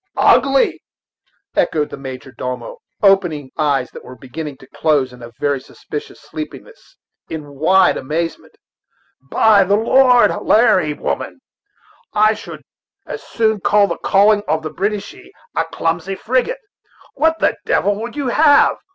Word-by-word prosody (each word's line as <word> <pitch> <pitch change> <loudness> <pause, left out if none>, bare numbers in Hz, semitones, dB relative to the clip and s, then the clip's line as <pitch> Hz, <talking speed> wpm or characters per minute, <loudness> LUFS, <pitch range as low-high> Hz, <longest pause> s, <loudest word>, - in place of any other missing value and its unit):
"Ugly!" 275 0 +3 0.7
echoed 150 -2 0
the - - -5
major 130 -1 -8
domo, 125 - -6 0.3
opening 175 -9 +2
eyes 140 -5 0
that - - -11
were 130 - -11
beginning 135 +4 -8
to 130 - -17
close 145 -5 +1
in 125 - -14
a 120 - -9
very 145 -2 0
suspicious 145 +2 -9
sleepiness, 305 - -10 0.3
in 150 -3 -7
wide 180 +6 +3
amazement. 160 +4 -4 0.7
"By 200 +9 +4
the 200 +2 +2
Lord 245 +3 +4
Harry, 215 -9 +3
woman, - - -4 0.7
I 215 +1 +4
should - - -10 0.4
as - - -7
soon 220 -2 0
think 195 - -2
of 205 -1 +3
calling 205 +1 +4
the 155 -1 -1
Boadishey 205 +4 -4 0.3
a - - +1
clumsy 165 +4 -2
frigate. 260 - -1 0.5
What 320 +3 +1
the - - +1
devil 205 - +2
would 235 +3 -6
you 280 -4 -2
have? 295 +3 +4
185 Hz, 135 wpm, -18 LUFS, 145-220 Hz, 0.7 s, By